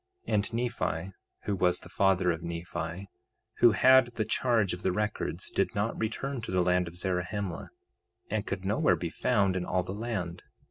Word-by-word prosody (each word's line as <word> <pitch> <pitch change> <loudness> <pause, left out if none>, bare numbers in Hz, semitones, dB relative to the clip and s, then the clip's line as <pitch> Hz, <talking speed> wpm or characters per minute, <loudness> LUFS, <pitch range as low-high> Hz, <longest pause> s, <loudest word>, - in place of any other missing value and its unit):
2:9 - - -2
And 105 +2 +1
Nephi, 95 - -2 0.3
who 100 - -1
was 90 -1 +2
the - - -11
father 95 -2 +2
of 85 0 -4
Nephi, 85 +2 -5 0.5
who 120 -2 +7
had 130 +3 +6
the 115 -3 -3
charge 115 -4 +1
of 90 - -6
the 95 - +1
records, 105 +3 -2
did - - 0
not 105 +3 0
return 120 +4 -3
to 115 - -7
the 90 -1 +2
land 90 0 +2
of 85 - -9
Zarahemla, 90 0 -3 0.6
and 110 0 -2
could 95 -1 -3
nowhere 100 +3 +3
be - - -4
found 95 -2 +2
in 90 - -1
all 90 0 0
the 90 - -5
land. 105 -5 -4
95 Hz, 185 wpm, -29 LUFS, 90-110 Hz, 0.6 s, who